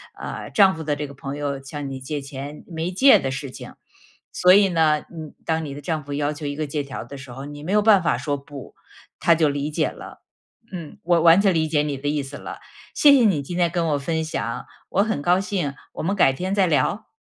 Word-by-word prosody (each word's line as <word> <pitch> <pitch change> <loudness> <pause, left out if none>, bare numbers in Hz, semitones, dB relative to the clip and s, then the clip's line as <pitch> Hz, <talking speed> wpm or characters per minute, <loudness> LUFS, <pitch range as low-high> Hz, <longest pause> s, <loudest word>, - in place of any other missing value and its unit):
呃， - - -7
丈 195 -3 +5
夫 160 - -6
的 150 -1 -1
这 145 0 -4
个 140 - -12
朋 135 +1 -6
友 140 -2 -3
向 140 +1 -6
你 135 -1 -6
借 145 +3 -4
钱， 140 +2 -8
没 165 0 -3
借 240 +5 +6
的 135 -8 -3
事 135 0 -5
情。 - - -10 0.6
所 180 0 +5
以 200 0 +6
呢， 160 -3 +3
嗯， 160 -3 -8
当 160 0 -1
你 140 - -6
的 145 - -8
丈 155 -1 -3
夫 145 - -6
要 145 +1 0
求 150 0 -8
一 145 0 -3
个 155 0 -3
借 145 +1 -2
条 135 -1 -7
的 140 - -10
时 135 -1 -11
候， 135 +3 -8
你 145 0 -9
没 175 - -4
有 210 +1 +4
办 205 -2 +5
法 170 - +1
说： 145 -1 -2
“不”， 140 -1 -11 0.4
他 170 - +4
就 155 -2 +3
理 145 +1 -2
解 - - +1
了。 - - -12 0.5
嗯， 170 -5 -8
我 175 0 +3
完 170 +3 +7
全 195 -2 +3
理 160 -1 +1
解 150 -1 +2
你 145 -2 -3
的 145 - -5
意 145 -1 0
思 140 +1 -8
了， - - -8 0.4
谢 290 - +7
谢 260 -4 +6
你 185 -9 +2
今 175 +6 -6
天 175 -1 +3
跟 170 -1 -1
我 145 - +1
分 160 +3 -2
享。 115 -7 -4 0.2
我 200 - +2
很 220 -9 -2
高 175 +4 +3
兴， 180 -8 -2 0.2
我 - - -4
们 190 +5 0
改 175 - +5
天 185 +8 -3
再 195 -2 +4
聊。 165 - 0
150 Hz, 270 characters per minute, -23 LUFS, 140-175 Hz, 0.6 s, 完